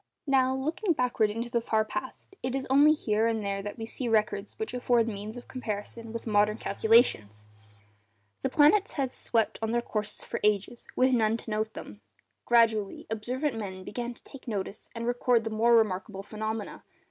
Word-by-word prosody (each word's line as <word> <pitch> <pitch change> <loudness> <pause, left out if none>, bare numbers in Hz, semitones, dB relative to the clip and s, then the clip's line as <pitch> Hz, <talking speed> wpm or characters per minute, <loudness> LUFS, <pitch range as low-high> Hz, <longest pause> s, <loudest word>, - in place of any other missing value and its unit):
Now, 265 -2 +3
looking 325 +8 0
backward 245 -5 +1
into 230 +3 -4
the 235 -2 +1
far 220 -1 +1
past, 215 - -6
it 255 0 -2
is 270 -1 -2
only 290 +3 +7
here 220 -7 +1
and 225 -2 -1
there 195 0 -2
that 205 +3 -6
we 225 - -5
see 245 +2 -3
records 210 -2 0
which 440 - -4
afford 245 -2 +2
means 215 +1 -5
of 245 - -10
comparison 225 -1 -5
with 230 0 -6
modern 210 -1 +2
calculations. 195 - +2 0.9
The - - 0
planets 340 +8 +4
had 270 -3 -1
swept 225 -3 0
on 220 - -1
in - - -1
their 240 - +2
courses 210 -2 -3
for - - -4
ages 210 +3 0
with 260 +1 +3
none 225 -2 +2
to 225 - -7
note 215 +1 -2
them. 105 0 -9 0.4
Gradually, 225 -4 +2
observant 250 +5 -2
men 190 -3 -6
began 240 +4 -5
to 275 - -13
notice 200 -2 -4
and 230 0 -4
record 245 -1 +2
the 225 - -4
more 230 +2 +4
remarkable 195 -2 0
phenomena. 215 0 -5
225 Hz, 180 wpm, -28 LUFS, 210-245 Hz, 0.9 s, only